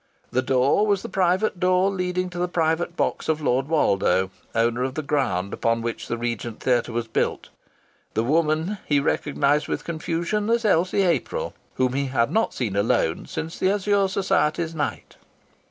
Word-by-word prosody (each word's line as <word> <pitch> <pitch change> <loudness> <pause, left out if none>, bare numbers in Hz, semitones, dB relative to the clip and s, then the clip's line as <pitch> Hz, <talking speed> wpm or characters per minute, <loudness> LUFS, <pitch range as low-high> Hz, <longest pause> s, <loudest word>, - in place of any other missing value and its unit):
The 130 - +2
door 135 +10 +2
was 200 -2 +1
the - - -6
private 185 +1 +1
door 185 +1 +3
leading 180 -1 -2
to 175 - -6
the 180 - +1
private 170 0 0
box - - -1
of 155 -1 +1
Lord 135 -2 +1
Woldo, 95 - +2 0.2
owner 115 +2 +1
of 130 0 -2
the 155 - -2
ground 100 - -1
upon 115 0 0
which 115 -1 -4
the 120 - -2
Regent 115 -1 -4
Theatre 120 -2 +1
was 115 0 -2
built. 110 - -1 0.7
The 110 - +2
woman 160 - +1
he 145 -1 +3
recognized 145 0 +1
with - - -3
confusion 170 +6 -2
as 235 0 +2
Elsie 185 0 +3
April, 480 - -1 0.2
whom 130 -1 +1
he 140 +1 0
had 130 -1 +1
not 220 +5 +1
seen 110 -6 -3
alone 100 -5 +1
since 160 +1 -5
the 185 - +2
Azure 200 0 +2
Society's 170 -4 0
night. 155 -2 -4
155 Hz, 170 wpm, -24 LUFS, 125-185 Hz, 0.7 s, door